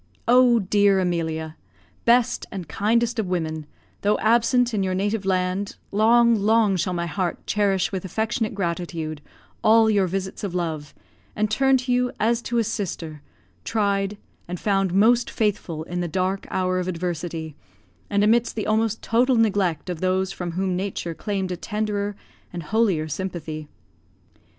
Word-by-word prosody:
Oh, 245 0 +6
dear 200 -1 +3
Emilia! 160 -3 -2 0.5
best 240 0 +3
and 185 -5 -6
kindest 230 +8 +1
of 210 - -1
women, 160 -4 -2 0.3
though 205 +1 +2
absent 235 +2 +3
in 205 - +1
your 185 -1 0
native 205 +1 -1
land, 185 +1 0 0.2
long, 235 +3 +5
long 215 -1 +3
shall 180 +1 -1
my 170 -1 -1
heart 180 0 -3
cherish 195 -2 +1
with 190 -2 -3
affectionate 220 +3 -2
gratitude 170 -4 -3 0.4
all 220 0 +5
your 200 -3 +2
visits 190 +2 -4
of 190 -3 -3
love, 160 -4 -3 0.4
and 215 0 0
turn 270 +3 +4
to 250 0 -3
you 250 0 +2
as 230 +2 +2
to 240 0 -2
a 230 - +3
sister, 170 -8 -4 0.4
tried, 200 -2 0 0.3
and 175 0 -5
found 195 -3 +1
most 230 +6 +4
faithful, 195 -7 -1
in 175 +2 -4
the 175 - -1
dark 185 +3 -1
hour 185 0 0
of 180 - -3
adversity, 165 -3 -4 0.5
and, 205 0 +2
amidst 230 +2 +3
the 215 - -2
almost 220 0 0
total 245 +3 +3
neglect 200 -8 +1
of 175 -3 -4
those 185 +1 +1
from 180 -3 -5
whom 185 +1 -1
nature 180 -2 -3
claimed 190 +1 -3
a - - -1
tenderer 205 0 -2 0.4
and 175 -1 -6
holier 195 -4 +1
sympathy. 155 -2 -5
195 Hz, 155 wpm, -23 LUFS, 175-220 Hz, 0.5 s, Oh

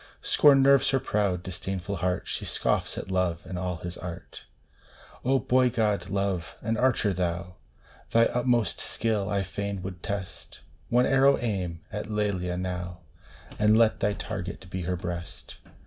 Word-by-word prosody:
Scorn 140 -2 +6
nerves 140 -1 +5
her 135 - +2
proud, 100 -7 0
disdainful 95 +1 -4
heart! 90 +1 -1
She - - -2
scoffs - - 0
at 95 - -5
Love 90 -3 0
and 90 -1 -5
all 90 -1 -2
his 85 +2 -7
art! 90 -1 -8 0.8
Oh, 135 +2 +3
boy 130 -1 +3
god, 105 -6 0
Love! 95 -3 -2
An 115 +1 0
archer 115 -4 +2
thou! 90 0 -3 0.5
Thy 115 0 +5
utmost 120 -2 +1
skill 105 -3 -1
I 100 -1 +1
fain 100 0 -4
would 95 -2 -6
test; 100 -2 -6 0.3
One 125 +1 +4
arrow 135 +1 +5
aim 95 -8 -3
at 105 0 -5
Lelia 100 -4 -1
now, 90 -1 -4 0.6
And 105 +1 +5
let 115 -1 +4
thy 105 - +1
target 95 -3 -6
be 95 - -3
her 90 - +1
breast 85 -1 -7
100 Hz, 155 wpm, -27 LUFS, 90-110 Hz, 0.8 s, Scorn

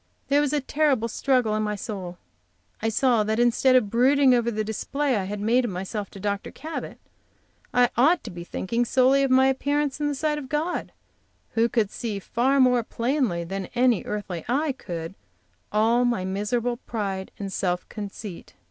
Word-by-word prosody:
There 285 +1 +4
was 290 -2 0
a 295 -1 +1
terrible 275 -4 +1
struggle 250 -1 +1
in 215 - 0
my 210 -1 -1
soul. 190 -5 -6 0.6
I 225 - +1
saw 235 0 +3
that 215 +1 -1
instead 240 +2 +4
of 215 -6 +3
brooding 260 +2 +5
over 235 -1 +2
the 215 -1 -2
display 265 +6 -1
I 195 -3 -1
had 205 +2 -4
made 235 +5 +2
of 240 - -1
myself 195 +3 -4
to 195 - -11
Dr. 200 0 -2
Cabot 315 +3 -7 0.7
I 245 -1 +3
ought 310 +8 +4
to 220 - -7
be 175 -1 -7
thinking 230 +7 -1
solely 260 +3 +3
of 275 - +2
my 260 +1 +5
appearance 285 +2 0
in 295 - 0
the 290 - -1
sight 300 +1 -1
of 265 -3 -9
God, 305 +5 -2 0.6
who 230 +1 +2
could 220 -4 +1
see 225 -4 -4
far 250 +7 +1
more 250 -2 +5
plainly 235 - -1
than 190 +2 -5
any 245 -4 +3
earthly 195 -5 -4
eye 290 +4 +1
could 170 -8 -6 0.6
all 225 +3 +3
my 235 -6 0
miserable 220 +5 -1
pride 200 -6 -4
and 195 -2 -5
self 180 -1 -1
conceit. 205 - -8
235 Hz, 185 wpm, -25 LUFS, 205-265 Hz, 0.7 s, brooding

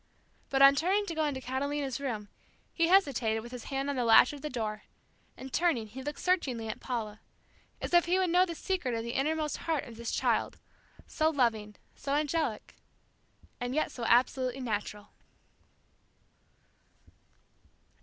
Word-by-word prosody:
But 270 0 +4
on 275 0 +9
turning 375 +8 +1
to 340 - -4
go 315 -1 0
into 285 -3 -2
Catalina's 270 +1 -2
room, 225 -7 -4 0.5
he 335 -1 +2
hesitated 265 - +3
with 240 - -10
his 250 -2 -8
hand 275 0 -3
on 285 - -1
the 250 - 0
latch 235 +3 +6
of 285 - -9
the 300 - -4
door, 215 -4 -3 0.6
and 265 0 -9
turning, 325 -10 +1
he 230 +5 -9
looked 290 +2 -5
searchingly 265 -11 0
at 215 - -5
Paula, 220 -4 -4 0.6
as - - -5
if 345 0 +6
he 355 +2 +2
would 370 -2 +1
know 360 +1 +5
the 340 -3 -3
secret 340 -10 -2
of 225 - -3
the 235 0 -4
innermost 305 +2 -1
heart 320 -4 -1
of 230 -2 -11
this 235 0 -5
child, - - 0 0.5
so 315 0 +1
loving, 225 -8 0 0.2
so 280 0 -3
angelic, 305 +2 -1 0.9
and 245 +1 -3
yet 310 - 0
so 245 - -7
absolutely 255 +2 +2
natural. 210 -3 -4
270 Hz, 165 wpm, -30 LUFS, 235-310 Hz, 0.9 s, on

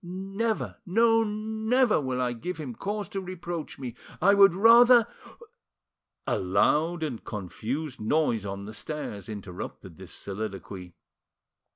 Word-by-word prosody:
Never, 195 +5 -3
no, 225 +4 +3
never 220 0 +1
will 130 -2 -2
I 125 -1 0
give 180 +10 -5
him 145 -6 -6
cause 205 - -4
to 195 - -4
reproach 175 -3 -6
me! 125 -3 -6 0.3
I 200 +2 +5
would 195 -3 +6
rather——" 235 +3 +7 1.2
A - - 0
loud 150 - +2
and 130 -8 -4
confused 120 - -5
noise 115 -2 +1
on 100 0 -5
the 110 - -8
stairs 115 -6 -6
interrupted 100 -4 -8
this - - -11
soliloquy. 95 -3 -6
160 Hz, 130 wpm, -27 LUFS, -, 1.2 s, rather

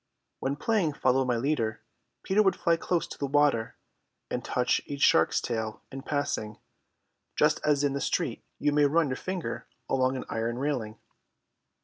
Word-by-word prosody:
When 135 +1 -1
playing 180 -1 +1
Follow 130 -1 +2
my 125 -2 +1
Leader, 115 -4 -1 0.4
Peter 200 +3 +3
would 190 -3 +3
fly 170 - +2
close 170 +1 -1
to - - -10
the 140 - -1
water 140 -5 +2 0.6
and - - -2
touch 125 0 +1
each 140 0 -3
shark's 165 - +4
tail 110 -2 -3
in 135 - -6
passing, 135 -7 -2 0.8
just 150 +1 +3
as 145 -1 +2
in 140 -1 +2
the 140 - -2
street - - -1
you 150 - +1
may 145 0 +4
run 150 +1 +3
your 130 - -1
finger 185 -2 -4 0.2
along 130 0 +1
an - - -5
iron 115 +1 -2
railing. 125 -6 -2
140 Hz, 165 wpm, -28 LUFS, 125-150 Hz, 0.8 s, shark's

